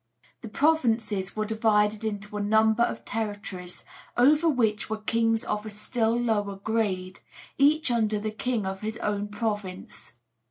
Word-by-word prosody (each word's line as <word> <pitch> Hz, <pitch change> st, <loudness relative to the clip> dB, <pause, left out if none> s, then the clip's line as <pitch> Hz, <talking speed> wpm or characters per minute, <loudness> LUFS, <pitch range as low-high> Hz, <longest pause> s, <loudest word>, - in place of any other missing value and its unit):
The 230 Hz, -, -7 dB
provinces 225 Hz, -9 st, +1 dB
were 215 Hz, 0 st, -1 dB
divided 215 Hz, -1 st, +2 dB
into 210 Hz, -1 st, -4 dB
a 210 Hz, -, -1 dB
number 220 Hz, +2 st, +3 dB
of -, -, 0 dB
territories, 205 Hz, -5 st, -5 dB, 0.3 s
over 300 Hz, +6 st, +5 dB
which 225 Hz, -7 st, +1 dB
were 220 Hz, -, -2 dB
kings 225 Hz, +1 st, +1 dB
of 210 Hz, -2 st, -2 dB
a 215 Hz, -, -6 dB
still 225 Hz, +2 st, 0 dB
lower 210 Hz, -4 st, 0 dB
grade, 195 Hz, -3 st, -2 dB, 0.4 s
each 295 Hz, 0 st, +4 dB
under 215 Hz, -3 st, +1 dB
the 215 Hz, +1 st, -3 dB
king 225 Hz, -1 st, -2 dB
of 190 Hz, 0 st, -4 dB
his 220 Hz, +1 st, -3 dB
own 205 Hz, -2 st, -2 dB
province. 205 Hz, -, -5 dB
215 Hz, 150 wpm, -27 LUFS, 205-230 Hz, 0.4 s, over